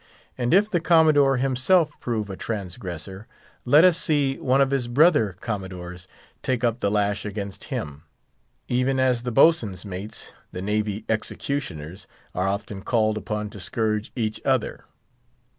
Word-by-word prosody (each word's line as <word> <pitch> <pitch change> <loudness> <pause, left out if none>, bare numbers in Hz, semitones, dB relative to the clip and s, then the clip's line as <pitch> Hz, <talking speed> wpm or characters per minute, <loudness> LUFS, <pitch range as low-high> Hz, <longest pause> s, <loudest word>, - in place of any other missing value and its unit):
And 120 -1 -1
if 200 +4 +5
the 180 -5 0
Commodore 155 -5 +4
himself 135 +5 +2
prove 110 -4 -3
a - - -5
transgressor, 95 -2 -6 0.4
let 145 +6 +6
us 180 -2 +5
see 145 -6 +1
one 130 +1 +2
of 135 -1 +3
his 135 -3 0
brother 125 - +4
Commodores 90 -4 -6 0.3
take 125 -2 -1
up 120 0 +1
the 100 - +1
lash 105 0 0
against 100 -2 -6
him, 75 0 -5 0.7
even 125 +2 +1
as 130 -2 +2
the 125 0 -3
boatswain's 115 - +3
mates, 100 +2 -7 0.2
the 90 - -6
navy 105 +1 -1
executioners, 100 - -4 0.3
are 90 +1 -1
often 100 0 -3
called 110 0 +1
upon 105 -1 -4
to 100 - -10
scourge 105 +3 -2
each 110 -3 -2
other. - - 0
110 Hz, 145 wpm, -24 LUFS, 100-135 Hz, 0.7 s, let